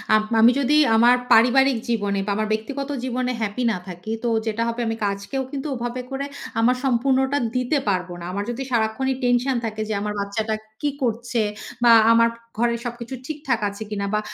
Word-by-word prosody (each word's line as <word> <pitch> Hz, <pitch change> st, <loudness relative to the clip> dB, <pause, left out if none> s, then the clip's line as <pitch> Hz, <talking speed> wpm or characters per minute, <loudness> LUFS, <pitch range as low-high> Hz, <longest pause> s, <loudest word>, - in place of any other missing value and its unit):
Up 215 Hz, -, +3 dB, 0.2 s
আমি 235 Hz, +2 st, +8 dB
যদি 280 Hz, +2 st, +2 dB, 0.2 s
আমার 240 Hz, +2 st, +6 dB, 0.2 s
পারিবারিক 255 Hz, +3 st, +5 dB
জীবনে 205 Hz, -3 st, 0 dB
বা 205 Hz, -, -1 dB
আমার 215 Hz, +1 st, -1 dB
ব্যক্তিগত 270 Hz, +6 st, -4 dB
জীবনে 255 Hz, 0 st, -1 dB
হ্যাপি 220 Hz, +3 st, -2 dB
না 210 Hz, -, -2 dB
থাকি। 180 Hz, +4 st, -7 dB
তো 240 Hz, -, +1 dB, 0.2 s
যেটা 220 Hz, +1 st, 0 dB
হবে, 235 Hz, +1 st, -2 dB
আমি 225 Hz, -, -1 dB
কাজকেও 200 Hz, +7 st, -2 dB
কিন্তু 280 Hz, 0 st, -4 dB
ওভাবে 240 Hz, +1 st, -4 dB
করে 270 Hz, +1 st, -3 dB, 0.3 s
আমার 245 Hz, +3 st, +4 dB
সম্পূর্ণটা 265 Hz, +2 st, +2 dB, 0.2 s
দিতে 250 Hz, +4 st, +1 dB
পারব 180 Hz, -2 st, -1 dB
না। 170 Hz, -, -7 dB
আমার 200 Hz, +2 st, -2 dB
যদি 250 Hz, +3 st, -4 dB
সারাক্ষণই 235 Hz, +3 st, 0 dB
টেনশন 245 Hz, +2 st, +2 dB
থাকে 215 Hz, -1 st, -4 dB
যে, -, -, 0 dB
আমার 210 Hz, 0 st, -2 dB
বাচ্চাটা 215 Hz, +2 st, -2 dB, 0.3 s
কি 295 Hz, -, +1 dB
করছে 235 Hz, 0 st, -1 dB, 0.4 s
বা 240 Hz, -, +7 dB, 0.2 s
আমার 230 Hz, 0 st, +5 dB, 0.3 s
ঘরে 235 Hz, +1 st, +2 dB
সবকিছু 240 Hz, +1 st, -6 dB
ঠিকঠাক 290 Hz, -5 st, -2 dB
আছে 200 Hz, +2 st, -7 dB
কিনা 200 Hz, -1 st, -3 dB
বা 210 Hz, -, +2 dB
235 Hz, 185 wpm, -23 LUFS, 215-255 Hz, 0.4 s, আমি